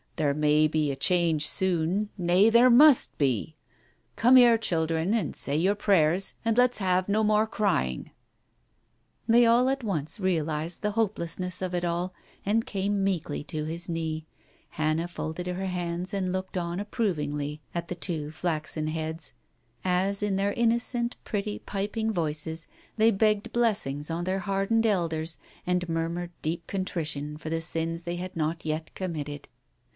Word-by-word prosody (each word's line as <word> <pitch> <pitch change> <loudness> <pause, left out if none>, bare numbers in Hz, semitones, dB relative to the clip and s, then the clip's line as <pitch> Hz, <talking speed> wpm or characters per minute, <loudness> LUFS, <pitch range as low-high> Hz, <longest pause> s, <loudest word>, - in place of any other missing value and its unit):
There 145 -2 +1
may 150 0 +4
be 155 -1 0
a - - -3
change 160 0 +2
soon, 190 +3 0
nay, 180 +4 +4
there 235 +2 +6
must 280 +2 +6
be.... 140 +2 0 0.6
Come 245 +3 +5
here, 240 -2 +7
children, 165 -2 0
and 225 - -1
say 140 - 0
your 185 +6 +3
prayers, 190 -3 +2
and 225 0 +1
let's 250 0 +4
have 185 -1 +1
no 215 +2 +2
more 215 +1 +3
crying." 195 - -1 1.2
They 235 +1 +6
all 240 +2 +4
at 270 -1 -1
once 160 -5 -2
realized 165 -3 -1
the 210 - 0
hopelessness 185 -4 -1
of 185 -1 -2
it 175 0 -1
all, 175 +2 -1 0.3
and 220 +3 +1
came 200 0 -1
meekly 175 -7 -1
to 155 -1 -4
his 165 +3 -5
knee, 160 -1 -3 0.5
Hannah 155 +2 0
folded 175 0 -5
her 180 +2 -3
hands 180 +1 -3
and 190 -2 -1
looked 185 0 -3
on 170 0 -2
approvingly 150 - -2
at 170 0 -3
the 180 - -4
two 165 -4 -3
flaxen 155 -1 -2
heads, 160 0 -4 0.5
as 190 +2 +1
in 205 -2 0
their 200 +1 0
innocent, 235 +1 0
pretty, 205 0 -3
piping 210 +3 -2
voices 160 -2 -2 0.3
they 220 +1 +5
begged 210 0 +1
blessings 195 -11 0
on 170 +1 -2
their 185 +2 -1
hardened 195 +4 +1
elders, 165 -6 0 0.3
and 180 0 0
murmured 165 +1 -2
deep 165 +2 -3
contrition 150 -6 -3
for 155 - -6
the 165 0 -1
sins 165 0 -2
they 175 0 -3
had 185 +1 -6
not 160 +1 -2
yet 155 +1 -3
committed. 150 -6 -5
175 Hz, 155 wpm, -27 LUFS, 160-205 Hz, 1.2 s, here